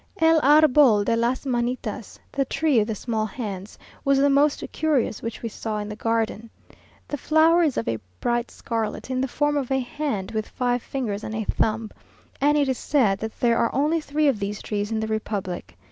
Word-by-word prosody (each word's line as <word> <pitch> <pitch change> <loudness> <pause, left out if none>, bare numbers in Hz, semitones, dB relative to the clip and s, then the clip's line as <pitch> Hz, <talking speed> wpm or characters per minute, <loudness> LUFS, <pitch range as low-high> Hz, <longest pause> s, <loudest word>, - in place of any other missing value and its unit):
El 325 0 +5
Arbol 285 -7 +6
de 230 - +2
las 240 +4 0
Manitas 240 -4 -3
(the 275 - +1
tree 295 -2 +2
of 210 - +1
the 220 - -2
small 220 0 -2
hands) 200 -3 -6 0.3
was 275 0 +3
the 280 +1 +4
most 285 +1 +3
curious 290 -9 0
which 230 +1 -6
we 230 - -2
saw 215 0 -4
in 210 0 -4
the 210 - -5
garden. 225 0 -1 0.6
The 290 - -4
flower 320 +4 +4
is 305 -6 +1
of - - -2
a 110 - -1 0.2
bright 240 - 0
scarlet, 225 +2 -4
in 255 0 0
the 265 - 0
form 295 +3 0
of 275 -4 -1
a 265 0 +2
hand, 245 -6 -3
with 215 -1 -3
five 245 -1 0
fingers 220 -7 -4
and 220 - -5
a 220 - -1
thumb; 220 +1 -1 0.5
and 295 +1 +4
it 285 -2 +2
is 260 -2 -1
said 220 -10 +2
that 220 0 -6
there 235 -1 +3
are 230 - +2
only 305 +4 +2
three 300 0 0
of 260 -7 +2
these 200 0 -3
trees 205 0 -3
in 220 - 0
the 220 - -2
republic. 195 - -4
235 Hz, 205 wpm, -24 LUFS, 215-280 Hz, 0.6 s, Arbol